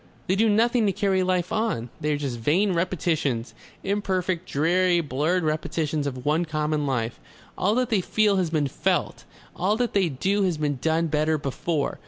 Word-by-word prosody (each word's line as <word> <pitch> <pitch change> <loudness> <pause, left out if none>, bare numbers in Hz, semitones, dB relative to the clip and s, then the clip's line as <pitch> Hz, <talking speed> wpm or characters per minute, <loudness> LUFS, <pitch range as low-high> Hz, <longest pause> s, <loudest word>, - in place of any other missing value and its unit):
They 185 - +1
do 220 +2 +3
nothing 230 +1 +3
to - - +3
carry 190 0 +1
life 180 -1 0
on. 215 - -1
They 150 -1 -1
are 145 - +1
just 135 -5 -4
vain 180 - +2
repetitions 160 -8 -1 0.3
imperfect 185 -3 -1
dreary, 175 +4 +2
blurred 160 +4 0
repetitions 155 -1 -1
of 130 -2 -6
one 155 +4 +2
common 155 -2 -1
life. 120 -4 -2 0.4
All 205 +4 +1
that 250 -1 0
they 205 -4 +3
feel 210 +1 +2
has 180 -3 +1
been 155 -3 +1
felt, 135 - -1 0.3
all 200 +4 +1
that 245 0 -1
they 190 -4 +2
do 195 +9 0
has 180 -4 +1
been 145 -2 -1
done 160 +2 +1
better 155 0 +1
before. 145 +2 -2
170 Hz, 180 wpm, -25 LUFS, 150-190 Hz, 0.4 s, do